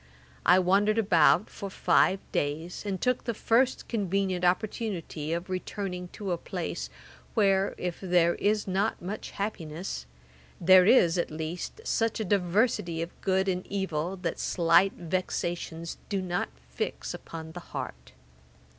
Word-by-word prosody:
I 180 - +8
wandered 200 +4 +3
about 195 -2 +4
for 200 - -7
five 190 0 +3
days, 155 +5 -2
and 190 -2 -2
took 250 +5 +1
the 235 - -2
first 245 +5 +2
convenient 195 -4 -1
opportunity 180 -5 -1
of 170 +2 -2
returning 185 -1 -4
to 200 -3 -4
a 170 - -1
place, 60 - -4 0.5
where, 195 0 +3
if 180 -2 -3
there 175 -2 +3
is 210 0 0
not 195 +4 0
much 195 +5 -5
happiness, 170 - -4 0.5
there 185 +1 +7
is, 180 -8 +5
at - - 0
least, 160 - -5
such 225 - 0
a 220 - -1
diversity 180 -3 +1
of 170 - -10
good 190 0 +1
and 185 -1 0
evil, 190 -2 -2
that 180 - -3
slight 170 +3 +4
vexations 170 -1 -3
do 200 -2 0
not 180 -1 -2 0.2
fix - - -4
upon 160 -1 -8
the 175 - -7
heart. 65 - -7
185 Hz, 140 wpm, -28 LUFS, 170-200 Hz, 0.5 s, I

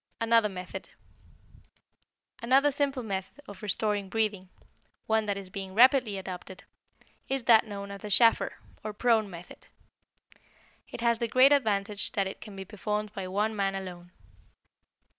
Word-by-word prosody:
Another 230 -1 +3
Method 180 -1 -8 1.5
Another 270 +5 +4
simple 275 -2 -1
method 195 +3 -5
of 200 -2 -11
restoring 205 -1 -1
breathing, 205 -3 -1 0.6
one 220 -1 +1
that 200 -1 -1
is 190 -2 -9
being 195 -1 -6
rapidly 245 -3 +5
adopted, 185 0 -8 0.7
is 270 -1 -1
that 230 -1 +5
known 200 -1 -7
as 200 - -8
the 210 - -6
Schafer, 230 +3 +4 0.3
or 215 0 -4
prone, 220 -2 +2
method. 175 -1 -12 1.2
It - - -8
has 235 -1 +2
the 235 - 0
great 255 +4 +5
advantage 210 -7 +1
that 195 - +1
it 190 - -7
can 210 -3 -10
be 195 0 -7
performed 210 +1 -4
by 195 -3 -5
one 210 +4 -1
man 195 -1 0
alone. 180 -2 -8
210 Hz, 145 wpm, -28 LUFS, 195-230 Hz, 1.5 s, rapidly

